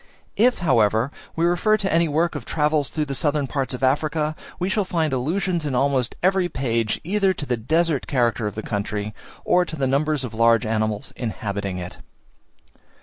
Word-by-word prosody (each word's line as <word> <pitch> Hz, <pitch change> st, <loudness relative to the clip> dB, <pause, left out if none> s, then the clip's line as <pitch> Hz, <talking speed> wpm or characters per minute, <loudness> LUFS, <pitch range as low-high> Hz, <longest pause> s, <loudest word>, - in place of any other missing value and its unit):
If, 245 Hz, +4 st, +4 dB
however, 115 Hz, -2 st, +3 dB, 0.2 s
we 165 Hz, -, +1 dB
refer 175 Hz, +5 st, +3 dB
to 195 Hz, -4 st, -1 dB
any 165 Hz, 0 st, +3 dB
work 160 Hz, +3 st, +1 dB
of 145 Hz, -5 st, -5 dB
travels 150 Hz, 0 st, +1 dB
through 155 Hz, -1 st, -2 dB
the 140 Hz, -, -4 dB
southern 145 Hz, +1 st, +1 dB
parts 135 Hz, -1 st, -2 dB
of 125 Hz, -, -8 dB
Africa, 150 Hz, +3 st, +1 dB, 0.2 s
we 180 Hz, -, -1 dB
shall 205 Hz, +2 st, +1 dB
find 165 Hz, -5 st, -1 dB
allusions 170 Hz, +6 st, 0 dB
in 145 Hz, -4 st, -2 dB
almost 135 Hz, -2 st, +1 dB
every 185 Hz, -1 st, +3 dB
page 115 Hz, -6 st, -1 dB
either 195 Hz, +2 st, +1 dB
to 145 Hz, -, -5 dB
the 125 Hz, -, 0 dB
desert 155 Hz, +5 st, 0 dB
character 120 Hz, -4 st, +1 dB
of 105 Hz, -, -5 dB
the 110 Hz, -, -5 dB
country, 105 Hz, 0 st, -3 dB, 0.3 s
or 180 Hz, -, +4 dB
to 165 Hz, -, -6 dB
the 140 Hz, -3 st, -1 dB
numbers 140 Hz, +2 st, +1 dB
of 120 Hz, -4 st, -5 dB
large 115 Hz, 0 st, +4 dB
animals 110 Hz, -1 st, -1 dB
inhabiting 100 Hz, -5 st, -3 dB
it. 90 Hz, 0 st, -7 dB
140 Hz, 185 wpm, -23 LUFS, 115-165 Hz, 0.3 s, If